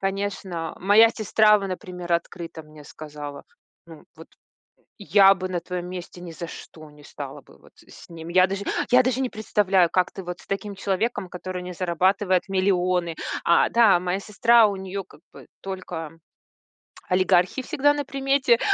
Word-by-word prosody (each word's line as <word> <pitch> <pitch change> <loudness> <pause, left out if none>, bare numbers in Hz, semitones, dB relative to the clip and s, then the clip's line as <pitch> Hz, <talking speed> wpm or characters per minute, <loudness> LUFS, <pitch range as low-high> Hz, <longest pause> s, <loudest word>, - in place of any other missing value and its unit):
Конечно, 195 -4 -4
моя 205 +4 +6
сестра, 215 -1 +3
во 195 - -4
например, 180 -2 -6
открыто 170 -1 -3
мне 155 -1 -15
сказала, 145 -1 -9 0.4
ну 165 -2 -14
вот: 160 +1 -13 0.7
"Я 195 -1 +6
бы 185 0 -5
на 180 - -2
твоём 180 0 -5
месте 180 -1 -8
ни 180 - -8
за 165 +1 -7
что 155 -1 -12
не 150 0 -18
стала - - -9
бы - - -20
вот - - -21 0.2
с - - -15
ним". 165 -1 -10
Я 185 +1 +5
даже 195 +2 -4 0.3
я 250 +1 +7
даже 255 +1 0
не 260 - -1
представляю, 195 -4 +2
как 180 0 +1
ты 195 - -8
вот 180 0 -6
с - - -19
таким 200 +1 -4
человеком, 195 +1 -2
который 180 0 -6
не 180 0 -7
зарабатывает 185 +2 +1
миллионы. 180 -3 0 0.3
А, 170 - +4
да, 220 -7 +5
моя 180 +1 -2
сестра, 225 +2 +4
у 200 - -3
неё 190 +1 -5
как 185 - -20
бы - - -14
только 180 -5 -6 1.0
олигархи 185 +6 +2
всегда 290 0 +2
на 290 -1 -3
примете. 270 -3 +1
185 Hz, 170 wpm, -24 LUFS, 175-205 Hz, 1.0 s, я